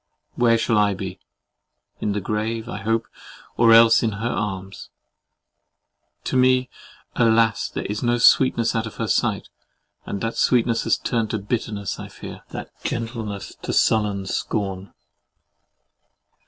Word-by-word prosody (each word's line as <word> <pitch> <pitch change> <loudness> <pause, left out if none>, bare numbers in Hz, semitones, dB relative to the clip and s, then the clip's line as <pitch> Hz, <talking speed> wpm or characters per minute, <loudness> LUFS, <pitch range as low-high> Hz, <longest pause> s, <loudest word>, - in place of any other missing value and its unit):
Where 115 -1 +3
shall 115 -1 +1
I 100 -1 +2
be? 95 -1 -6 0.8
In 105 - -1
the 105 - -2
grave, 110 +3 -3
I 120 - -5
hope, 115 +3 -1 0.5
or 115 0 +5
else 115 0 +7
in 110 -2 0
her 110 +4 -3
arms. 95 -3 -4 1.3
To - - -3
me, 130 0 +3 0.4
alas! 115 -2 +3
there - - -5
is 105 +1 -3
no 120 0 +1
sweetness 120 0 +4
out 115 0 -1
of 110 - -10
her - - -3
sight, - - 0 0.6
and 100 - -3
that 115 0 -3
sweetness 115 -2 +2
has - - +2
turned 115 -3 -1
to 110 - -1
bitterness, 105 -1 -3
I - - -7
fear; - - -10
that - - -7
gentleness 115 -4 -4
to - - -3
sullen 105 -3 +2
scorn! 95 -1 -3
110 Hz, 140 wpm, -22 LUFS, 100-115 Hz, 1.3 s, else